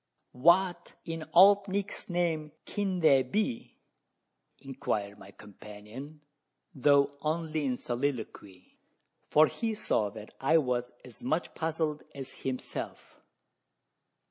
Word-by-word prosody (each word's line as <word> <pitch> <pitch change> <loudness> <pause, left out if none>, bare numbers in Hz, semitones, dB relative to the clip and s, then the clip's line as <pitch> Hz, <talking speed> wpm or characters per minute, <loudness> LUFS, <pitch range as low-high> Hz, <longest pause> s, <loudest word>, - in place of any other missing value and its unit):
"What, 175 +7 +3
in 165 -1 -5
Old 200 +3 +7
Nick's 200 +1 -3
name, 165 -4 -1
kin 195 -3 -2
they 140 -4 +6
be?" 130 - -2 0.8
inquired 105 -7 -4
my 95 - -12
companion 105 +9 -11 0.5
though 140 +1 +4
only 155 -1 -1
in 125 -2 0
soliloquy, 120 -8 -5 0.5
for 155 +1 +6
he 225 +7 -3
saw 110 - 0
that 105 +1 -11
I 155 +5 +4
was 125 -4 0
as 125 -3 -12
much 155 +7 -1
puzzled 160 -2 -2
as 135 -1 -7
himself. 130 -1 -5
145 Hz, 110 wpm, -30 LUFS, 125-170 Hz, 0.8 s, Old